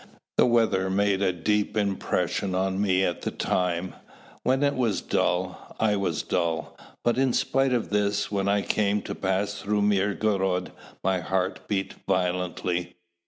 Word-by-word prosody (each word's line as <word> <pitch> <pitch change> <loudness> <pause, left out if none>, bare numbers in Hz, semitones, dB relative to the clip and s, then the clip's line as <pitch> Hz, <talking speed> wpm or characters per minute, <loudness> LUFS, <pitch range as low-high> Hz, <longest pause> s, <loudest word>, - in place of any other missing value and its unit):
The - - +6
weather 115 -5 +2
made 100 0 +2
a 95 -2 +3
deep 105 +5 0
impression 100 -1 0
on 95 +1 0
me 95 -2 +3
at 85 - -2
the - - -2
time: 90 -1 -1 0.5
when 130 +3 +2
it 140 0 +3
was 115 -6 0
dull, 90 +1 -1
I 105 -2 +3
was 100 -1 -1
dull; 80 -2 -1 0.3
but 120 +1 +2
in 130 -2 +2
spite 135 0 +2
of 120 -4 0
this, 105 0 +1
when 100 -1 0
I 100 0 +2
came 105 -1 +1
to - - -4
pass 100 +2 -1
through 105 0 +1
Mirgorod, 100 -2 +1 0.3
my 95 -1 +2
heart 95 +2 -2
beat 95 -2 -1 0.2
violently. 90 -1 -1
100 Hz, 155 wpm, -26 LUFS, 95-105 Hz, 0.5 s, The